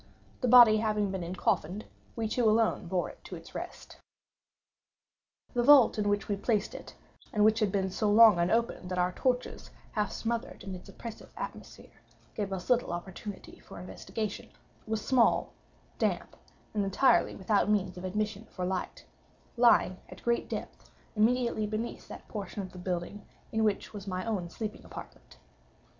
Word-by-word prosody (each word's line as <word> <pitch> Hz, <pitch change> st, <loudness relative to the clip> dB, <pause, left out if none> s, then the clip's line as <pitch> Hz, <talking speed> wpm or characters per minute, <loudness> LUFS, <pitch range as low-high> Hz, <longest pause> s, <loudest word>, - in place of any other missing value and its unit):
The 250 Hz, -, +1 dB
body 235 Hz, -3 st, +9 dB
having 210 Hz, -2 st, 0 dB
been 190 Hz, -1 st, -3 dB
encoffined, 180 Hz, +2 st, -1 dB, 0.3 s
we 225 Hz, -1 st, -1 dB
two 225 Hz, 0 st, +2 dB
alone 220 Hz, -4 st, +2 dB
bore 180 Hz, 0 st, -1 dB
it -, -, -20 dB
to -, -, -7 dB
its -, -, -12 dB
rest. -, -, -8 dB, 1.6 s
The 245 Hz, -, +2 dB
vault 255 Hz, -4 st, +7 dB
in 205 Hz, -1 st, +1 dB
which 205 Hz, 0 st, 0 dB
we 205 Hz, -, -1 dB
placed 210 Hz, 0 st, 0 dB
it -, -, -10 dB, 0.4 s
(and 210 Hz, 0 st, +3 dB
which 220 Hz, +1 st, +4 dB
had 210 Hz, -4 st, +1 dB
been 190 Hz, -1 st, 0 dB
so 210 Hz, +2 st, 0 dB
long 215 Hz, -3 st, +8 dB
unopened 185 Hz, +1 st, 0 dB
that 180 Hz, -, -3 dB
our 180 Hz, 0 st, +2 dB
torches, 250 Hz, +5 st, -2 dB, 0.2 s
half 210 Hz, -2 st, -1 dB
smothered 230 Hz, 0 st, -3 dB
in 195 Hz, -, -6 dB
its 180 Hz, -, -10 dB
oppressive 230 Hz, -2 st, -9 dB
atmosphere, -, -, -9 dB, 0.3 s
gave 205 Hz, -2 st, -3 dB
us 185 Hz, -2 st, -4 dB
little 245 Hz, -6 st, +2 dB
opportunity 190 Hz, +3 st, -7 dB
for -, -, -11 dB
investigation) 195 Hz, +3 st, -5 dB, 0.4 s
was 220 Hz, -1 st, -2 dB
small, 250 Hz, -3 st, +3 dB, 0.5 s
damp, -, -, -1 dB, 0.4 s
and 210 Hz, -2 st, +1 dB
entirely 195 Hz, +7 st, +3 dB
without 200 Hz, +1 st, +1 dB
means 205 Hz, -3 st, +1 dB
of 180 Hz, -, -8 dB
admission 210 Hz, +2 st, -2 dB
for 180 Hz, -, -5 dB
light; 185 Hz, 0 st, -3 dB, 0.5 s
lying, 235 Hz, -6 st, +4 dB
at -, -, -12 dB
great 235 Hz, 0 st, 0 dB
depth, -, -, -6 dB, 0.3 s
immediately 230 Hz, 0 st, +2 dB
beneath 215 Hz, +3 st, -4 dB
that -, -, -10 dB
portion 205 Hz, -1 st, -5 dB
of 185 Hz, -, -8 dB
the 185 Hz, -, -10 dB
building 180 Hz, +3 st, -4 dB, 0.3 s
in 220 Hz, 0 st, +1 dB
which 210 Hz, 0 st, 0 dB
was 200 Hz, -1 st, -8 dB
my 185 Hz, +1 st, -3 dB
own 195 Hz, -6 st, -2 dB
sleeping 215 Hz, +4 st, -6 dB
apartment. -, -, -11 dB
210 Hz, 165 wpm, -30 LUFS, 190-225 Hz, 1.6 s, body